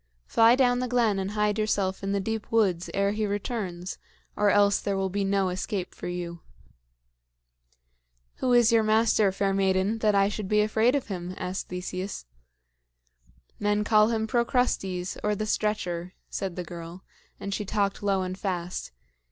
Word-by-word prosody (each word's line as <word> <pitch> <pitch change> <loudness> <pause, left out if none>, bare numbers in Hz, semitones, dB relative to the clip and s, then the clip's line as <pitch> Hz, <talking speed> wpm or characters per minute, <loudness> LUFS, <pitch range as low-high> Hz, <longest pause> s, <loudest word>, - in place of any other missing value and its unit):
Fly 230 +1 +5
down 245 -2 +3
the 250 - -1
glen 230 -5 +2
and 190 0 -2
hide 210 0 0
yourself 200 -3 0
in 195 0 -2
the 200 - +1
deep 220 +2 -4
woods 190 -6 +2
ere 200 0 +1
he 210 0 -1
returns, 195 -4 -4 0.4
or 205 0 +3
else 200 0 +4
there 200 -1 -1
will 190 -1 -1
be 200 +1 -1
no 195 -1 +1
escape 185 +1 -3
for - - -7
you." 175 -1 -5 2.0
"Who 255 - 0
is 240 -1 +5
your 230 -1 +5
master, 215 -2 +3
fair 195 +1 0
maiden, 195 +2 +1
that 215 -2 +2
I 195 0 +4
should 205 -1 -4
be 210 +1 +3
afraid 220 +4 +2
of 280 - -2
him?" 180 -1 -5
asked 180 +1 -4
Theseus. 180 - -5 1.3
"Men 205 0 +1
call 215 0 +5
him 220 -1 0
Procrustes, 220 -6 0
or 210 0 +1
the 215 - -2
Stretcher," 185 -5 -2 0.2
said 190 -3 -3
the 180 - -4
girl 170 +1 -9 0.4
and 200 - -4
she 210 - -2
talked 200 0 -1
low 195 -2 +1
and 185 0 -4
fast. 180 - -4
200 Hz, 170 wpm, -27 LUFS, 185-215 Hz, 2.0 s, Fly